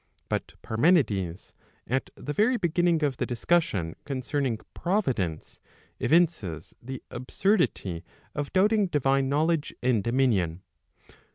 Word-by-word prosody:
But - - -2
Parmenides, 110 - +1 0.3
at 130 +2 -1
the 145 - -5
very 225 - +3
beginning 175 -3 +2
of 140 -4 0
the - - 0
discussion 115 - 0
concerning 135 -2 -1 0.2
Providence, 130 - -1 0.4
evinces 150 - +1
the 130 +1 -7
absurdity 125 - 0 0.3
of 145 -1 -3
doubting 205 +2 +3
divine 135 -4 +1
knowledge 155 +2 +1
and 120 -5 +2
dominion. 105 -9 +1
135 Hz, 105 wpm, -27 LUFS, 110-170 Hz, 0.4 s, very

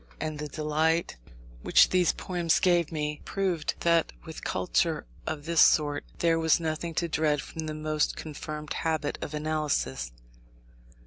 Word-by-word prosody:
And 155 -1 -4
the 150 - -3
delight 155 - 0 0.5
which - - +5
these 180 -3 +3
poems 175 -3 0
gave 175 -3 +3
me, 150 -1 -3
proved 185 -5 -1
that 170 -1 +3
with 160 -1 -8
culture 165 -3 0 0.2
of 150 -2 -4
this 165 -1 +3
sort, 145 -2 +4
there 165 -1 +2
was 160 0 +3
nothing 165 0 -3
to 170 - 0
dread 155 -2 +1
from 160 +3 -6
the 155 - -4
most 155 0 0
confirmed 150 0 -6
habit 160 -2 -1
of 150 - -4
analysis. 150 - -1
155 Hz, 145 wpm, -28 LUFS, 150-165 Hz, 0.5 s, which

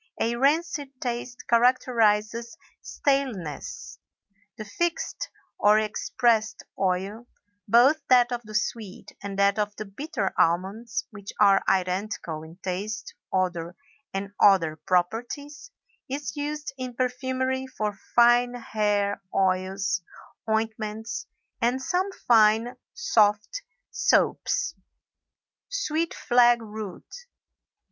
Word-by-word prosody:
A 235 +1 +1
rancid 285 0 0
taste 245 0 -5
characterizes 235 -2 +2 0.2
staleness. 265 - -2 0.6
The 215 - -6
fixed 340 +11 -2 0.3
or 210 +1 +5
expressed 220 +1 +1 0.2
oil, 195 +5 -1 0.4
both 250 +8 +5
that 250 -1 +5
of 240 -1 -2
the 215 -1 -10
sweet 215 -2 -3
and 200 -1 -6
that 200 +1 +3
of 210 0 -1
the 215 - -6
bitter 210 - -3
almonds 215 +10 0
(which 205 -2 -9
are 200 -2 +6
identical 185 -3 -1
in 160 +1 -12
taste, 205 +4 -4 0.2
odor, 175 -2 -1 0.4
and 195 +1 -4
other 175 -6 +5
properties), 230 - -2 0.4
is 285 +3 -4
used 295 0 -4
in 255 -1 -5
perfumery 260 +1 -1
for 215 -5 -3 0.2
fine 240 +1 +5
hair 205 -4 0
oils, 190 0 +1 0.5
ointments, 220 0 -2 0.3
and 245 +3 +2
some 365 +8 -1 0.2
fine 225 +1 +5 0.2
soft 220 - +2 0.3
soaps. - - +1 1.0
SWEET 335 -10 -1
FLAG 240 0 +4
ROOT. 215 - -9
225 Hz, 100 wpm, -26 LUFS, 200-255 Hz, 1.0 s, are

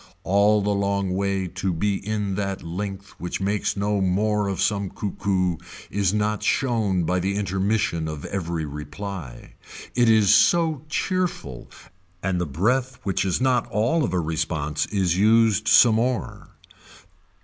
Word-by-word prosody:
All 100 +2 +3
the 105 0 +1
long 100 -1 0
way 95 0 -1
to 95 +2 -3
be 100 +4 -1
in 105 -1 -2
that 100 0 -3
length 95 +3 -5
which 90 - -4
makes 100 +1 -1
no 100 0 0
more 105 +2 +1
of 95 -3 -3
some 100 0 0
cuckoo 95 -4 -1 0.3
is 100 -2 +1
not 105 +1 0
shown 105 -6 +1
by 90 +3 0
the 95 +2 -1
intermission 95 -3 0
of 75 -2 -6
every 85 -4 -3
reply. 75 -1 -7 0.4
It 120 -1 +3
is 105 -3 +5
so 160 0 +3
cheerful 175 - -2 0.5
and 90 -1 0
the 90 - -2
breath 125 - 0
which 95 -3 0
is 95 -3 0
not 130 -2 +2
all 120 +10 +1
of - - -1
a 90 - 0
response 80 -2 -2
is 95 -4 0
used 110 0 +3
some 115 -3 +6
more. 125 +1 -2
100 Hz, 150 wpm, -24 LUFS, 90-105 Hz, 0.5 s, some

